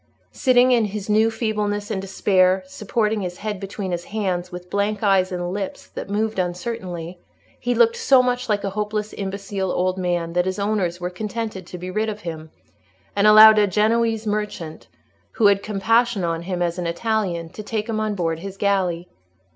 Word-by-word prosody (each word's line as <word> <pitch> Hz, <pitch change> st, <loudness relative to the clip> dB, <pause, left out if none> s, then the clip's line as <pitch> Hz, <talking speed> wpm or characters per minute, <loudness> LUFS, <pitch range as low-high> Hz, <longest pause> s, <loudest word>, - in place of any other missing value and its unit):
Sitting 255 Hz, -1 st, +4 dB
in 235 Hz, -3 st, +4 dB
his 205 Hz, 0 st, -5 dB
new 220 Hz, +2 st, +4 dB
feebleness 210 Hz, -2 st, -2 dB
and 195 Hz, -3 st, -2 dB
despair, 190 Hz, -1 st, +2 dB
supporting 210 Hz, +2 st, -1 dB
his 180 Hz, -1 st, -5 dB
head 210 Hz, -2 st, -4 dB
between 195 Hz, -1 st, -5 dB
his 175 Hz, 0 st, -3 dB
hands, 185 Hz, -4 st, -2 dB
with 180 Hz, 0 st, -8 dB
blank 205 Hz, +1 st, -1 dB
eyes 195 Hz, -2 st, +3 dB
and 175 Hz, 0 st, -3 dB
lips 195 Hz, -1 st, -5 dB
that -, -, -7 dB
moved 215 Hz, 0 st, -1 dB
uncertainly, 180 Hz, -2 st, -4 dB, 0.4 s
he 245 Hz, 0 st, -1 dB
looked 230 Hz, 0 st, +4 dB
so 260 Hz, -2 st, +5 dB
much 250 Hz, -1 st, -1 dB
like 205 Hz, -1 st, +1 dB
a 195 Hz, -, -2 dB
hopelessly 210 Hz, +1 st, -3 dB
imbecile 195 Hz, -1 st, -3 dB
old 185 Hz, +1 st, 0 dB
man, 175 Hz, -2 st, -1 dB
that 180 Hz, 0 st, +2 dB
his 185 Hz, -, -2 dB
owners 200 Hz, -4 st, -1 dB
were 180 Hz, 0 st, -3 dB
contented 210 Hz, -1 st, -5 dB
to 180 Hz, -, -8 dB
be 180 Hz, +1 st, -6 dB
rid 215 Hz, +3 st, 0 dB
of 210 Hz, 0 st, -6 dB
him, 160 Hz, -3 st, -7 dB, 0.7 s
and 205 Hz, +1 st, +4 dB
allowed 215 Hz, 0 st, +9 dB
a 205 Hz, -, +4 dB
Genoese 225 Hz, +2 st, +1 dB
merchant, 205 Hz, -7 st, -4 dB, 0.5 s
who 225 Hz, -, +1 dB
had 200 Hz, -1 st, +5 dB
compassion 220 Hz, +1 st, +1 dB
on 165 Hz, -1 st, -1 dB
him 175 Hz, 0 st, -2 dB
as 170 Hz, +1 st, -2 dB
an 175 Hz, -, -2 dB
Italian, 175 Hz, -2 st, -1 dB
to -, -, -8 dB
take 215 Hz, 0 st, -3 dB
him 220 Hz, -2 st, -2 dB
on 215 Hz, -1 st, -1 dB
board 165 Hz, -3 st, -1 dB
his 195 Hz, +2 st, -8 dB
galley. 185 Hz, -4 st, 0 dB
200 Hz, 185 wpm, -22 LUFS, 180-215 Hz, 0.7 s, allowed